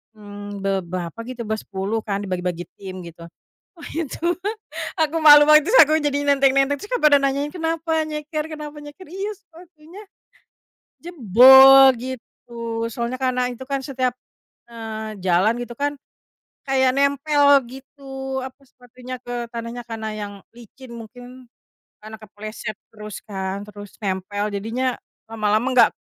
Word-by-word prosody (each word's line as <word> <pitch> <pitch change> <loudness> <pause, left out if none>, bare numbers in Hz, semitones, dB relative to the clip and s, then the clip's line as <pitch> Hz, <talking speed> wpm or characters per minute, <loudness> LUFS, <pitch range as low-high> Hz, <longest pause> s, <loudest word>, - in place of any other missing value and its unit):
mmm, 205 -1 -9
be 195 - 0 0.2
berapa 175 +3 -6
gitu, 250 -2 -6
bersepuluh 210 -1 -3
kan 205 -2 -4
dibagi-bagi 180 -2 -3 0.2
tim 185 -2 -8
gitu. 170 0 -11 0.5
Wah 335 - -11
itu 320 -4 -4 0.8
aku 315 0 +1
malu 295 -2 +9
waktu 310 +10 +5
aku 310 +1 +1
jadi 285 -1 -1
nenteng-nenteng 275 0 +3
terus 415 - -9
kek - - -1
pada 290 -2 +6
nanyain, 275 +2 -1
"Kenapa 325 -2 -2
nyeker 305 0 -4
kenapa 300 -1 -8
nyeker?" 295 +5 -12
"Iya 390 +3 -4
sepatunya, 345 -1 -16 1.1
jebol," 265 - +8
gitu 230 -2 -6
soalnya 235 +2 -3
karena 250 -1 0
itu 245 +2 -10
kan 275 +1 -2
setiap, 255 -3 -2 0.6
eee, 220 -2 -7
jalan 185 +5 +3
gitu 240 0 -8
kan 290 0 -1 0.7
kayak 265 -1 +3
nempel 285 +1 +2 0.2
gitu 270 0 -7
apa, 265 +1 -11
sepatunya 250 0 -11
ke 240 -1 -5
tanahnya, 235 +1 -6
karena 220 -1 -5
yang 205 -1 -6 0.2
licin 240 +2 -14
mungkin, 245 +2 -12 0.5
karena 220 0 -9
kepleset 215 +1 -8 0.2
terus 210 -2 -9
kan, 195 -1 -5
terus 205 -1 -12
nempel 200 +2 -2
jadinya 240 +5 -2 0.3
lama-lama 215 +1 0 0.2
gak - - -11
250 Hz, 135 wpm, -21 LUFS, 215-285 Hz, 1.1 s, malu